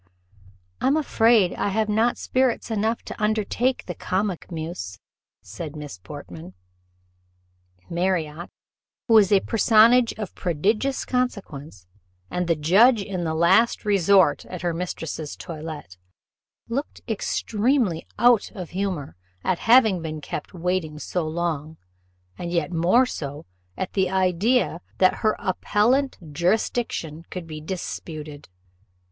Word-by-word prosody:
"I -, -, +2 dB
am 280 Hz, +3 st, +3 dB
afraid 225 Hz, -, +3 dB
I -, -, -1 dB
have 215 Hz, +2 st, 0 dB
not 220 Hz, +3 st, +2 dB
spirits 255 Hz, -2 st, 0 dB
enough 220 Hz, +2 st, 0 dB
to -, -, -8 dB
undertake 220 Hz, +4 st, 0 dB
the 180 Hz, -, -4 dB
comic 185 Hz, 0 st, -2 dB
muse," 160 Hz, -, -5 dB, 0.5 s
said 145 Hz, -, -7 dB
Miss 145 Hz, -11 st, -8 dB
Portman. 90 Hz, -, -10 dB, 1.3 s
Marriott, 170 Hz, -2 st, -1 dB, 0.6 s
who 230 Hz, -, +3 dB
was 215 Hz, -3 st, +6 dB
a 200 Hz, -2 st, +5 dB
personage 230 Hz, +2 st, +5 dB
of 210 Hz, -3 st, -6 dB
prodigious 210 Hz, -, 0 dB
consequence, 160 Hz, -, -3 dB, 0.5 s
and 180 Hz, -1 st, -1 dB
the 165 Hz, -, +3 dB
judge 200 Hz, -, +5 dB
in 185 Hz, -4 st, -4 dB
the 160 Hz, 0 st, -1 dB
last 190 Hz, +9 st, +3 dB
resort 200 Hz, -2 st, +4 dB
at 180 Hz, -1 st, -7 dB
her 175 Hz, -1 st, 0 dB
mistress's 165 Hz, -3 st, -5 dB
toilette, 155 Hz, -, -8 dB, 0.7 s
looked 270 Hz, +5 st, -4 dB
extremely 220 Hz, -, 0 dB
out 240 Hz, -1 st, +4 dB
of 180 Hz, -4 st, -7 dB
humour 180 Hz, -, -3 dB, 0.3 s
at 185 Hz, -, 0 dB
having 220 Hz, -7 st, +6 dB
been 155 Hz, -1 st, -5 dB
kept 150 Hz, -, -6 dB
waiting 175 Hz, -3 st, -2 dB
so 160 Hz, +3 st, -3 dB
long; 160 Hz, -1 st, -3 dB, 0.6 s
and 170 Hz, -, -4 dB
yet 170 Hz, -2 st, 0 dB
more 180 Hz, +10 st, +4 dB
so 145 Hz, -, -6 dB, 0.3 s
at 185 Hz, -, -4 dB
the 190 Hz, -2 st, +1 dB
idea 190 Hz, +2 st, +1 dB, 0.2 s
that 185 Hz, -, +4 dB
her 215 Hz, -, +2 dB
appellant 235 Hz, +8 st, +1 dB, 0.2 s
jurisdiction 175 Hz, -2 st, -1 dB
could 180 Hz, -2 st, -6 dB
be 155 Hz, -1 st, -8 dB
disputed. 155 Hz, -, -6 dB
185 Hz, 125 wpm, -24 LUFS, 160-220 Hz, 1.3 s, was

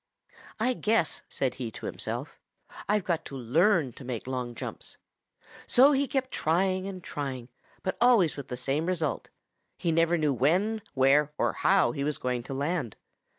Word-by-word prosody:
"'I 250 Hz, +3 st, +2 dB
guess,' 215 Hz, -7 st, +1 dB
said 130 Hz, -2 st, -1 dB
he 120 Hz, -, -2 dB
to -, -, -8 dB
himself, -, -, -5 dB, 0.5 s
'I've 210 Hz, -1 st, +2 dB
got 170 Hz, -2 st, -1 dB
to 135 Hz, -, -7 dB
learn 155 Hz, -, +3 dB
to -, -, -12 dB
make 125 Hz, -3 st, -5 dB
long 125 Hz, -2 st, -4 dB
jumps.' -, -, -6 dB, 0.7 s
So 270 Hz, +4 st, +6 dB
he 280 Hz, 0 st, +2 dB
kept 260 Hz, -1 st, -1 dB
trying 185 Hz, +4 st, +1 dB
and 185 Hz, -2 st, -7 dB
trying, 130 Hz, -4 st, -5 dB, 0.3 s
but 185 Hz, -, -2 dB
always 235 Hz, -10 st, +5 dB
with 140 Hz, -2 st, -7 dB
the 125 Hz, -, -5 dB
same 140 Hz, +6 st, -1 dB
result 165 Hz, -5 st, -1 dB, 0.5 s
he 170 Hz, -, 0 dB
never 165 Hz, +1 st, +3 dB
knew 150 Hz, -3 st, +1 dB
when, 185 Hz, -, +1 dB
where, 140 Hz, +3 st, +4 dB
or -, -, +1 dB
how 195 Hz, -1 st, +3 dB
he 140 Hz, -3 st, -3 dB
was 150 Hz, 0 st, -1 dB
going 125 Hz, -1 st, -2 dB
to -, -, -5 dB
land. 145 Hz, -, -2 dB
160 Hz, 170 wpm, -28 LUFS, 135-190 Hz, 0.7 s, So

